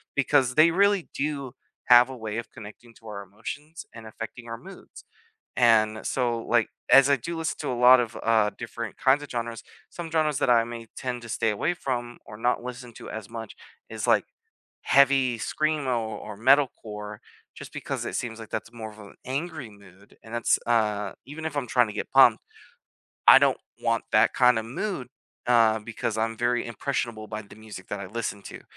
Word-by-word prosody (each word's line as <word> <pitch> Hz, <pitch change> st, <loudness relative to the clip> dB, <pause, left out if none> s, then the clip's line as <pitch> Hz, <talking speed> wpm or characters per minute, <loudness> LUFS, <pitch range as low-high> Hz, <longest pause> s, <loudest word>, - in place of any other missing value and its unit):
because 135 Hz, -2 st, +2 dB
they 160 Hz, +2 st, +6 dB
really 200 Hz, 0 st, +2 dB
do 140 Hz, -3 st, -3 dB, 0.4 s
have 125 Hz, 0 st, +7 dB
a 130 Hz, -, -7 dB
way 110 Hz, -1 st, -5 dB
of 115 Hz, -, -5 dB
connecting 115 Hz, +1 st, -13 dB
to 115 Hz, -, -15 dB
our 100 Hz, -2 st, -6 dB
emotions 145 Hz, -, -8 dB
and 115 Hz, -1 st, -10 dB
affecting 115 Hz, +2 st, -8 dB
our 115 Hz, 0 st, -5 dB
moods. 190 Hz, +11 st, -13 dB, 0.5 s
And 110 Hz, -3 st, +3 dB
so, 120 Hz, -3 st, 0 dB
like, 115 Hz, 0 st, +1 dB, 0.2 s
as 135 Hz, 0 st, +8 dB
I 140 Hz, -, +5 dB
do 170 Hz, +8 st, -5 dB
listen 160 Hz, -1 st, -2 dB
to -, -, -3 dB
a -, -, -1 dB
lot 125 Hz, +1 st, +7 dB
of, 120 Hz, -1 st, -3 dB
uh, 110 Hz, -2 st, +3 dB
different 115 Hz, -1 st, -6 dB
kinds 135 Hz, +2 st, +3 dB
of 145 Hz, -, -10 dB
genres, 115 Hz, -1 st, -4 dB, 0.3 s
some 170 Hz, -2 st, -7 dB
genres 155 Hz, -3 st, +1 dB
that -, -, +1 dB
I 115 Hz, -1 st, +5 dB
may 115 Hz, 0 st, -8 dB
tend 125 Hz, -2 st, -4 dB
to 120 Hz, -, -10 dB
stay 110 Hz, -, 0 dB
away 155 Hz, +11 st, -1 dB
from 120 Hz, -5 st, -4 dB
or 105 Hz, +1 st, -10 dB
not 120 Hz, +2 st, 0 dB
listen 125 Hz, -1 st, -8 dB
to -, -, -10 dB
as 110 Hz, -2 st, -7 dB
much 115 Hz, -2 st, -8 dB, 0.3 s
is, -, -, -4 dB
like, -, -, +4 dB, 0.6 s
heavy 135 Hz, -3 st, +4 dB
screamo, 145 Hz, -1 st, -1 dB, 0.2 s
or 105 Hz, -1 st, -8 dB
metal 135 Hz, +4 st, +5 dB
core 105 Hz, -1 st, -8 dB, 0.3 s
just -, -, -10 dB
because -, -, -4 dB
it -, -, -4 dB
seems 115 Hz, -2 st, -4 dB
like 110 Hz, -, -10 dB
that's 110 Hz, +1 st, -5 dB
more 110 Hz, -2 st, -7 dB
of 105 Hz, -, -16 dB
an 100 Hz, -1 st, -12 dB
angry 140 Hz, 0 st, -4 dB
mood 100 Hz, -1 st, -19 dB
and 110 Hz, -, -12 dB
that's, 120 Hz, -1 st, +2 dB
uh, 105 Hz, -4 st, +1 dB
even 155 Hz, +4 st, -8 dB
if 155 Hz, -, -4 dB
I'm 140 Hz, -3 st, -2 dB
trying 120 Hz, 0 st, +3 dB
to 105 Hz, -, -7 dB
get 105 Hz, -, -5 dB
pumped, -, -, +6 dB, 0.9 s
I -, -, +11 dB
don't -, -, +2 dB, 0.2 s
want -, -, 0 dB
that -, -, +4 dB
kind 125 Hz, -2 st, +5 dB
of 110 Hz, -, -3 dB
mood, 135 Hz, -, -4 dB, 0.4 s
uh, 115 Hz, -2 st, +4 dB
because 110 Hz, 0 st, -4 dB
I'm 115 Hz, +1 st, -1 dB
very 120 Hz, +1 st, 0 dB
impressionable 115 Hz, -2 st, -3 dB
by 110 Hz, 0 st, -5 dB
the 100 Hz, -, -15 dB
music 110 Hz, -4 st, -11 dB
that 100 Hz, -, -4 dB
I 100 Hz, -, -6 dB
listen 105 Hz, -1 st, -4 dB
to, -, -, -9 dB
120 Hz, 200 wpm, -26 LUFS, 110-135 Hz, 0.9 s, I